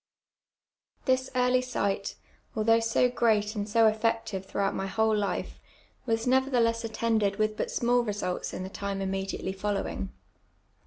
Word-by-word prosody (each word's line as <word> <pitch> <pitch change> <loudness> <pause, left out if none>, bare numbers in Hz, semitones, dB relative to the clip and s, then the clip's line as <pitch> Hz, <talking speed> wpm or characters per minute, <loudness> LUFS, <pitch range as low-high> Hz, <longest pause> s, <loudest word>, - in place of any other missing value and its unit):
This 260 0 +2
early 250 0 +3
sight, 200 -6 -2 0.4
although 225 +1 +4
so 230 +2 +3
great 220 -4 +2
and 205 0 -3
so 225 +2 +4
effective 220 -2 +1
through 200 - -2
out 195 - +1
my 195 - -2
whole 220 +2 +2
life, 205 -1 -2 0.5
was 225 0 0
nevertheless 250 -3 +2
attended 220 -2 +1
with 215 0 0
but - - -2
small 245 +1 +2
results 205 -5 -3
in - - -5
the 190 - -5
time 200 0 -4
immediately 195 0 -2
following. 195 0 -2
220 Hz, 145 wpm, -28 LUFS, 200-230 Hz, 0.5 s, although